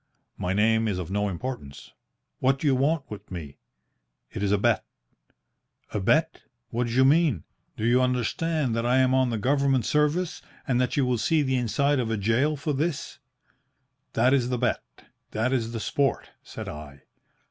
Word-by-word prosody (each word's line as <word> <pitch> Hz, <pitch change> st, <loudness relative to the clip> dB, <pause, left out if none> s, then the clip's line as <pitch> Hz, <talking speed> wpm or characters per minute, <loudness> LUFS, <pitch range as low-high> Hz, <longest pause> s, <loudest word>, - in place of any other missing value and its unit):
"'My 90 Hz, -, -2 dB
name 110 Hz, +2 st, +3 dB
is 100 Hz, -4 st, -1 dB
of 90 Hz, -1 st, -5 dB
no 105 Hz, +1 st, 0 dB
importance.' 90 Hz, -, -6 dB, 0.5 s
"'What 135 Hz, +1 st, +2 dB
do 145 Hz, -, -6 dB
you 140 Hz, -, +4 dB
want 140 Hz, +4 st, +1 dB
with 105 Hz, -, -9 dB
me?' 75 Hz, -7 st, -8 dB, 0.7 s
"It -, -, -5 dB
is 100 Hz, -1 st, +1 dB
a 105 Hz, -, +4 dB
bet.' 115 Hz, +1 st, +2 dB, 1.1 s
"'A -, -, 0 dB
bet? -, -, +1 dB, 0.3 s
What 120 Hz, +1 st, -1 dB
d'you 130 Hz, +3 st, +3 dB
mean? 145 Hz, -, +3 dB, 0.3 s
Do 110 Hz, -, -2 dB
you 120 Hz, +2 st, +4 dB
understand 125 Hz, +2 st, 0 dB
that 115 Hz, -, 0 dB
I 125 Hz, +2 st, +2 dB
am 130 Hz, 0 st, +3 dB
on 130 Hz, -1 st, +3 dB
the 115 Hz, -, -1 dB
Government 135 Hz, 0 st, +1 dB
service, 150 Hz, +4 st, +1 dB, 0.3 s
and 125 Hz, -2 st, +2 dB
that 125 Hz, +1 st, -1 dB
you 140 Hz, -, +3 dB
will 125 Hz, -2 st, 0 dB
see 155 Hz, +5 st, +2 dB
the 130 Hz, -1 st, 0 dB
inside 130 Hz, +4 st, +1 dB
of 120 Hz, -3 st, -1 dB
a 110 Hz, -, 0 dB
gaol 120 Hz, +9 st, +1 dB
for 150 Hz, +2 st, -2 dB
this?' 150 Hz, +2 st, -3 dB, 0.9 s
"'That 125 Hz, +4 st, +3 dB
is 125 Hz, -3 st, +2 dB
the 125 Hz, -, 0 dB
bet. 125 Hz, 0 st, 0 dB, 0.5 s
That 120 Hz, +4 st, 0 dB
is 115 Hz, -3 st, -1 dB
the 115 Hz, -, -4 dB
sport, 135 Hz, +5 st, -1 dB
said -, -, -8 dB
I.' 75 Hz, -2 st, -9 dB
125 Hz, 180 wpm, -26 LUFS, 110-135 Hz, 1.1 s, you